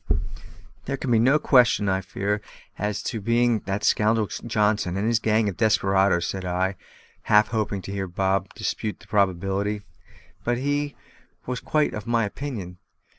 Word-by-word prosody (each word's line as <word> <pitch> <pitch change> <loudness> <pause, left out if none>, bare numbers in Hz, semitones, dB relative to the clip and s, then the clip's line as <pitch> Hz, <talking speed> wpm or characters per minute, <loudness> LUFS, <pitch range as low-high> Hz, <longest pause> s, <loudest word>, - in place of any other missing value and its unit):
"There 135 +1 -2
can 130 - -3
be 115 - +5
no 130 +6 +5
question, 125 -8 +4
I 95 0 +1
fear, 100 +3 -2 0.3
as 105 0 -2
to 115 - -3
its - - -12
being 115 0 +2
that 100 +1 -2
scoundrel 110 +1 +3 0.2
Johnson 105 -5 +1
and 100 - -1
his 115 -1 +3
gang 110 -1 +2
of 100 - -3
desperadoes," 95 -5 +3
said 95 -1 -4
I, 90 +2 -1 0.5
half 105 +1 +5
hoping 105 -4 -2
to - - -6
hear 100 -1 -3
Bob 95 +2 0
dispute 105 - -3
the - - -17
probability. 100 +1 0 0.6
But 120 0 0
he 145 +2 -1 0.5
was 125 0 -3
quite 150 -1 +1
of 105 +2 -6
my 115 -2 +2
opinion. 100 -7 -6
105 Hz, 165 wpm, -24 LUFS, 95-115 Hz, 0.6 s, be